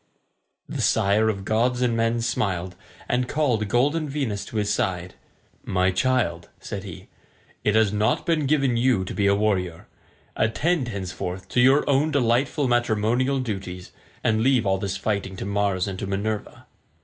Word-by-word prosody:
The - - -4
sire 105 +3 +3
of 100 -3 -3
gods 120 +4 +1
and 120 -2 +1
men 115 +1 +1
smiled, 95 -5 -2 0.3
and 125 0 0
called 125 -9 +1
golden 145 +7 +1
Venus 135 -8 -2
to - - -11
his 105 -1 +1
side. 90 -1 -2 0.5
"My 95 0 +1
child," 95 -5 0
said 100 -2 -6
he, 95 -5 -10 0.6
"it 105 - +2
has 110 -2 +3
not 105 +3 +1
been 160 -5 +1
given 135 -4 +2
you 120 -6 +2
to - - -5
be 100 -1 +1
a 100 - +4
warrior. 95 -5 -1 0.5
Attend, 145 +5 +1
henceforth, 95 -3 -5
to 125 - +2
your 135 +3 +4
own 140 +2 +3
delightful 135 +1 +1
matrimonial 120 +3 +1
duties, 95 -7 -5 0.3
and 110 0 +2
leave 125 -2 +3
all 95 -1 +1
this 100 0 -3
fighting 100 -1 -2
to - - -5
Mars 100 -2 0
and 95 -1 -5
to - - -4
Minerva." 100 +2 -3
110 Hz, 160 wpm, -24 LUFS, 95-125 Hz, 0.6 s, a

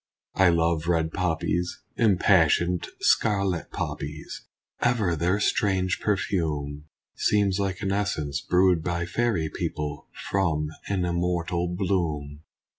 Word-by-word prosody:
I 95 -2 +5
love 85 -1 +1
red 80 -2 +1
poppies! 90 0 -1
Impassioned 90 -4 +3
scarlet 100 -6 +2
poppies! 75 +2 -6 0.3
Ever 110 -8 +2
their 90 +6 +1
strange 95 -3 +1
perfume 75 -8 -1 0.3
Seems 100 -2 +1
like 95 -1 -2
an 100 -2 -1
essence 80 -8 -1
brewed 90 -2 +3
by 85 -1 -1
fairy 105 -5 0
people 75 -1 -4 0.2
From 80 -6 +1 0.2
an 95 -3 0
immortal 85 0 -1
bloom. 85 -6 -2
90 Hz, 110 wpm, -26 LUFS, 80-95 Hz, 0.3 s, I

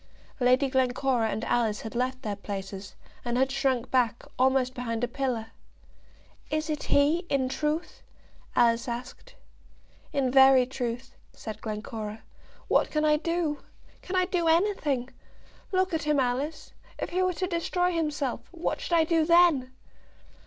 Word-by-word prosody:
Lady 255 +2 +4
Glencora 255 -2 +1
and 220 - -3
Alice 225 -3 +1
had 220 - -7
left 255 +2 -2
their 210 -3 -2
places, 195 -1 -7 0.3
and 240 0 -1
had 265 +1 +2
shrunk 265 -3 0
back, 240 -3 +1 0.2
almost 260 0 +3
behind 235 -2 -3
a - - +2
pillar. 240 -4 -3 1.0
"Is 310 +1 -1
it 300 - -2
he, 290 +4 +3
in 265 -2 +1
truth?" 300 +4 -2 0.5
Alice 235 +1 +3
asked. 245 +1 -7 0.8
"In 265 -3 0
very 265 -1 +7
truth," 245 -1 -5 0.2
said 215 -1 -8
Glencora. 215 0 -5 0.4
"What - - +3
can 305 0 0
I 300 0 +4
do? 335 -2 -1 0.4
Can 370 - -5
I 365 0 +3
do 355 -2 0
anything? 320 -8 +1 0.6
Look 375 -1 +1
at 320 - 0
him, 300 -1 +1
Alice. 265 +5 -2 0.2
If - - -4
he 365 +2 +1
were 370 0 +2
to 370 - -2
destroy 355 0 0
himself, 300 -6 -1
what 345 -1 -3
should - - -4
I 330 -1 +5
do 325 0 +2
then?" 335 -6 +4
265 Hz, 150 wpm, -27 LUFS, 240-315 Hz, 1.0 s, very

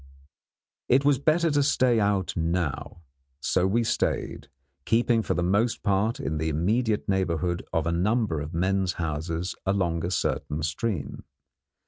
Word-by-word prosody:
It 135 +3 +4
was 145 -3 +4
better 160 +3 +2
to 145 0 +2
stay 130 -4 +3
out 100 -3 0
now. 85 -1 -2 0.4
So 90 +6 +1
we 115 +5 +1
stayed, - - -2 0.3
keeping 115 +3 +2
for 100 - -1
the 90 - 0
most 105 +7 +1
part 105 +5 +1
in 80 - -2
the 80 +1 0
immediate 105 +8 0
neighbourhood 90 -2 0
of 80 -2 0
a 85 - 0
number 95 0 +1
of 75 +1 -6
men's 95 +2 0
houses 80 +2 -3
along 90 -4 0
a 85 - -1
certain 80 -3 -2
stream. 80 - -3
95 Hz, 145 wpm, -26 LUFS, 85-115 Hz, 0.4 s, It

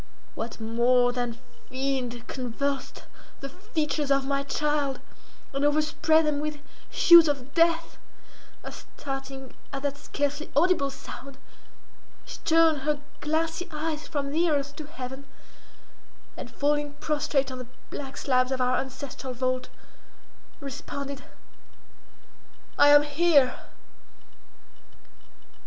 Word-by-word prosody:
What 230 +1 -5
more 240 +2 +3
than 245 -1 -3 0.3
fiend 255 -3 -2
convulsed 270 +2 -3 0.4
the 275 - -6
features 310 -4 -2
of 275 -1 +3
my 275 0 0
child, 285 -1 0 0.5
and 275 +1 -1
overspread 310 +2 +3
them 300 -1 +1
with 305 0 -3 0.3
hues 340 -2 +8
of 280 -2 -2
death, 330 -1 +2 0.6
as - - -9
starting 270 -1 -6 0.2
at 275 0 -5
that 285 0 -2
scarcely 290 +1 -2
audible 305 -2 +3
sound, 275 0 -10 0.9
she - - -8
turned 325 -2 +5
her 295 +1 0 0.2
glassy 320 +3 -1
eyes 310 0 -3
from 280 -1 -2
the 335 +3 +2
earth 285 -1 0
to 305 - -7
heaven, 265 -2 -7 1.1
and 245 - -7
falling 290 +3 0
prostrate 290 -3 0
on 255 - -6
the 250 - -7 0.2
black 280 0 -6
slabs 255 -1 +2
of 260 - 0
our 250 0 +2
ancestral 265 0 -5
vault, 255 +1 -1 0.9
responded—"I 280 +1 -5
am 290 0 +8
here!" 295 -3 +3
280 Hz, 110 wpm, -27 LUFS, 265-300 Hz, 1.1 s, hues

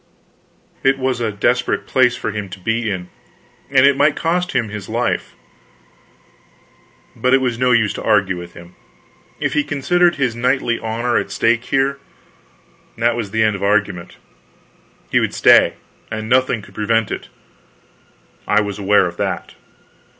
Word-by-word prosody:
It 135 0 +3
was 130 -2 -1
a 115 -2 -1
desperate 120 +5 0
place 125 -2 +3
for - - -4
him 105 -2 -5
to 95 - -9
be 115 +3 -1
in, 90 -2 -5 0.6
and 140 +1 +5
might 145 +1 +3
cost 175 +2 -1
him 115 -4 0
his 105 -2 -7
life, - - -2 1.8
but 125 +1 +2
it - - +3
was 125 -3 -2
no 125 0 +2
use 115 -4 +3
to - - -7
argue 100 -3 +2
with 85 0 -9
him. 85 +1 -13 0.7
If - - -1
he 150 - +2
considered 175 +5 +1
his 125 -5 -1
knightly 125 -1 0
honor 115 +2 -1
at - - -2
stake 115 +3 +1
here, 135 +1 0 1.0
that 115 +1 +1
was 115 -4 -4
the 110 +2 +1
end 110 -2 +2
of 100 - -7
argument; 100 -3 -1 0.9
he - - +4
would - - -2
stay, - - +5 0.3
and 110 0 -5
nothing 125 -3 +2
could - - -15
prevent 110 +1 0
it; - - -6 1.2
I 105 - +3
was 100 -1 -3
aware 100 -1 +3
of 85 -1 -5
that. - - -3
115 Hz, 155 wpm, -18 LUFS, 105-130 Hz, 1.8 s, and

